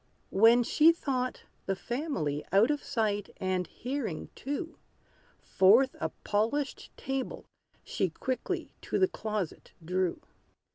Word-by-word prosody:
When 230 +5 +6
she 310 +7 +6
thought 255 -6 -2 0.2
the 195 - +1
family 190 - -2
Out 205 +8 +5
of 295 - -2
sight 210 -5 -1
and 185 -2 -1
hearing 250 - -4
too, 305 +5 -5 0.6
Forth 225 +8 +4
a - - -1
polished 230 +8 -1
table 270 -1 -4 0.4
she 190 - -1
Quickly 255 +9 -3
to - - -2
the 375 - +4
closet 215 - -4
drew. 180 0 0
230 Hz, 115 wpm, -30 LUFS, 190-275 Hz, 0.6 s, When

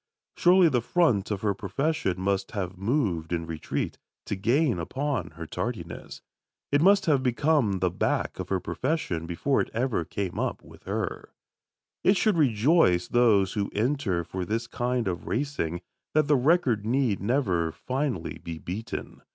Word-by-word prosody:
Surely 180 0 +6
the 125 -6 +2
front 120 - +2
of 105 -2 -2
her 105 -2 +1
profession 100 - -1
must 100 +3 -1
have 95 -3 -3
moved 95 - -1
in 85 -1 -1
retreat, 80 -2 -4 0.3
to - - -2
gain 120 - +2
upon 130 - -2
her 85 - -5
tardiness. 90 -3 -5 0.5
It 145 +1 +3
must 195 +2 +5
have 145 -6 +3
become 130 -2 +2
the 90 -2 +2
back - - -1
of - - -5
her 95 - +1
profession 85 - -2
before 130 +11 +1
ever 120 -4 0
it 80 - -8
came 95 -3 -3
up - - -2
with - - -16
her. - - -4 0.7
It 195 +1 +4
should 215 -1 +3
rejoice 120 - +3
those 105 -6 +4
who 100 -2 -1
enter 110 -6 0
for 95 +2 -4
this 115 +5 -2
kind 120 -1 -1
of 90 -2 -3
racing 115 - -2 0.3
that 155 -2 +4
the 150 - +5
record 130 - +2
need 120 -2 +1
never 95 - +1
finally 130 - -3
be 85 -1 -6
beaten. 100 +8 -6
115 Hz, 160 wpm, -27 LUFS, 90-140 Hz, 0.7 s, Surely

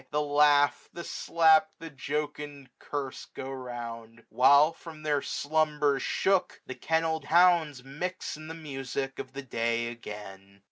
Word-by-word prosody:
The 150 - 0
laugh, 145 -1 +3
the 170 - -7
slap, 165 +3 +3
the 165 -1 -9
jocund 145 -1 -5
curse 140 -3 -5
go 135 0 -8
round; 115 -3 -7
While, 140 +5 +5
from 160 -2 -12
their 145 -2 +1
slumbers 150 -2 0
shook, 195 -1 0
the - - -6
kennel'd 160 +2 -1
hounds 170 -6 +4
Mix 175 +8 -5
in 155 +1 -10
the 160 - -7
music 135 -3 -5
of 130 - -7
the 140 +1 -6
day 115 -1 -1
again. 100 -4 -10
145 Hz, 140 wpm, -28 LUFS, 130-155 Hz, -, While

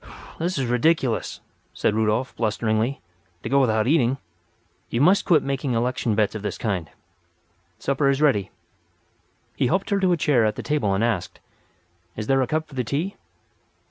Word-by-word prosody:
"This 175 +1 -1
is 135 - 0
ridiculous," 125 0 +1 0.3
said - - +1
Rudolf, 110 +4 0
blusteringly, 110 +3 -1 0.4
"to - - -4
go 140 0 +4
without 110 -4 +2
eating. 135 -2 +2 0.7
You 115 - -1
must 180 +8 +4
quit 160 -6 +4
making 135 -1 -2
election 115 -1 0
bets 105 -1 +1
of 110 - -5
this 105 -2 -4
kind. 95 -8 -2 0.9
Supper 140 0 +1
is 140 0 +1
ready." 105 -11 +2 1.1
He - - +1
helped 190 - 0
her 200 - +2
to 185 -2 +2
a 175 - +2
chair 140 -6 +3
at 110 -1 +1
the - - -6
table 115 -10 0
and 100 - 0
asked: 115 -7 -2 0.8
"Is 110 - -4
there 135 +3 +2
a 130 - 0
cup 155 +3 -1
for 150 - -17
the 130 -1 -1
tea?" 155 - -2
125 Hz, 175 wpm, -23 LUFS, 110-150 Hz, 1.1 s, go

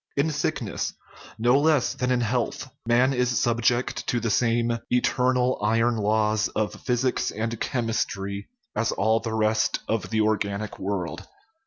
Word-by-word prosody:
In 150 +3 +2
sickness, 150 - -2 0.4
no 120 +4 +4
less 150 -3 +3
than 125 - -2
in 125 -1 +2
health, 120 +3 -1 0.2
man 125 +3 +4
is 125 -1 +1
subject 120 +1 +1
to 120 - +1
the 115 -1 -1
same 115 +1 +1
eternal 125 +1 +2
"iron 115 +3 +2
laws" 110 0 +1
of 110 -1 -2
physics 125 +1 0
and 115 +1 -3
chemistry 100 -4 -2 0.3
as 115 - +1
all 110 +3 +2
the 110 -1 -4
rest 110 0 +1
of 110 -1 -1
the 110 -1 +1
organic 105 -1 -1
world. 95 -3 -3
115 Hz, 145 wpm, -25 LUFS, 110-125 Hz, 0.4 s, no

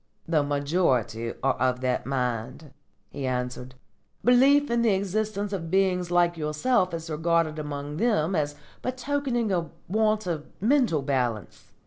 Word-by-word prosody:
"The 160 -2 +3
majority 140 - 0
are 135 -1 +3
of 130 -1 0
that 130 0 -1
mind," 130 +2 -3 0.4
he 135 -2 -4
answered. 125 0 -3 0.5
"Belief 270 +3 +5
in 235 0 +2
the 225 -4 +3
existence 205 +1 -2
of 165 -4 -4
beings 185 -1 +1
like 175 -1 +2
yourself 175 +6 +1
is 165 0 -6
regarded 160 0 0
among 145 0 -5
them 195 -6 +1
as 145 -2 -1 0.3
betokening 255 -3 -1
a 170 -3 -1 0.2
want 215 +2 +1
of 160 -4 -3
mental 225 - +2
balance. 125 - -2
165 Hz, 135 wpm, -26 LUFS, 140-210 Hz, 0.5 s, Belief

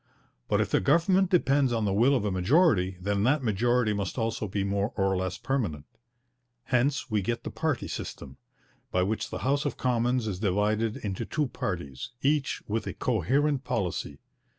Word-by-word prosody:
But - - +2
if - - 0
the - - +4
government 180 +5 +3
depends 140 -7 +3
on 115 -2 0
the 100 - +1
will 120 +8 +4
of 120 - 0
a 105 - 0
majority, 95 - +3
then 100 +2 -1
that 140 +2 +2
majority 120 +1 +2
must 100 +1 -3
also 115 -2 -1
be 100 +1 -2
more 100 +2 -1
or 95 -1 +1
less 95 0 -2
permanent. 95 - -2 0.8
Hence 130 +1 0
we 105 -1 +2
get 115 +5 -2
the - - -5
party 155 -6 -1
system, 65 -2 -7 0.5
by 90 - +2
which 105 +4 -2
the - - -4
House 140 +2 +2
of 145 - -3
Commons 125 -1 +1
is 100 -4 -3
divided 105 +2 +1
into 95 -3 -4
two 150 -1 -1
parties, 85 - -5
each 140 0 +1
with 110 +2 -2
a - - -4
coherent 135 - +1
policy. 90 - -2
115 Hz, 175 wpm, -28 LUFS, 95-135 Hz, 0.8 s, the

